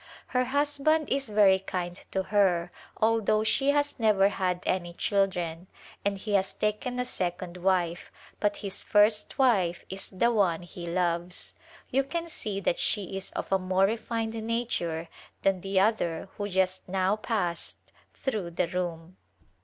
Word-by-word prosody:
Her 250 0 +1
husband 290 +3 +1
is 275 -1 0
very 205 -3 +5
kind 180 -2 -4
to 190 - -1
her 185 -4 +2 0.3
although 220 -1 +2
she 270 +5 +2
has 290 -1 +1
never 205 -3 +4
had 180 -3 -1
any 175 -2 -1
children 180 -4 0 0.4
and 200 0 0
he 205 +2 -4
has 195 -1 +2
taken 215 +4 -1
a 250 - 0
second 180 -4 -3
wife, 180 -2 0 0.3
but 205 -1 +1
his 195 - -3
first 210 0 +3
wife 195 -10 +2
is 190 0 -5
the 235 +5 +2
one 180 -7 +2
he 175 0 -8
loves. 175 0 -1 0.4
You 270 +1 +3
can 335 +5 -3
see 210 -10 -3
that 175 - 0
she 195 -3 0
is 195 - -4
of - - -4
a 195 - +4
more 185 +1 +2
refined 225 +1 -2
nature 220 -8 -2 0.4
than 195 -2 +2
the 195 0 +1
other 190 -4 +1
who 205 0 -3
just 185 -1 0
now 190 +2 +2
passed 205 -6 -2 0.3
through 215 -10 -3
the 170 0 -1
room. 175 0 -4
195 Hz, 155 wpm, -28 LUFS, 180-220 Hz, 0.4 s, very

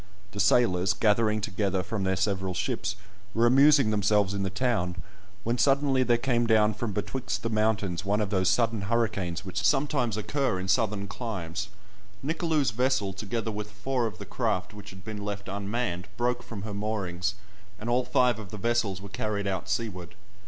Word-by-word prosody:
The 100 - -7
sailors, 100 -2 +4
gathering 110 0 +2
together 95 -2 -1
from 100 +1 -3
their 95 0 +1
several 95 -1 -1
ships, 100 -1 -1 0.4
were 115 +1 +4
amusing 135 -1 +6
themselves 105 -1 +2
in 100 - -2
the 95 - 0
town, 95 -4 0 0.5
when 120 +2 0
suddenly 135 -1 +3
there 120 -2 +3
came 120 -1 +1
down 110 -1 +4
from 105 +1 -3
betwixt 105 -1 -3
the 115 - -1
mountains 105 -4 +1
one 100 +2 +1
of 105 -2 -1
those 95 -2 +2
sudden 115 -3 +2
hurricanes 100 -7 0
which 95 +2 -3
sometimes 135 -6 +2
occur 110 -1 0
in 95 - -4
southern 100 -1 +1
climes. 100 -3 -4 0.6
Nicolou's 160 -4 +1
vessel, 120 -4 +1
together 110 +3 -3
with 105 0 -5
four 120 +4 -1
of 105 - -7
the - - -8
craft 90 +3 -1
which 105 -1 -10
had 95 0 -12
been 105 -2 -5
left 100 0 -4
unmanned, 100 -2 -2
broke 120 0 0
from 105 -5 -8
her 105 -1 -5
moorings, 100 -3 -2 0.4
and 110 - -7
all 125 +1 +2
five 125 -2 +2
of 105 -4 -8
the 105 - -7
vessels 105 -3 0
were - - -7
carried 105 -2 -2
out 95 -3 -2
seaward. 100 -4 -3
105 Hz, 180 wpm, -28 LUFS, 95-120 Hz, 0.6 s, amusing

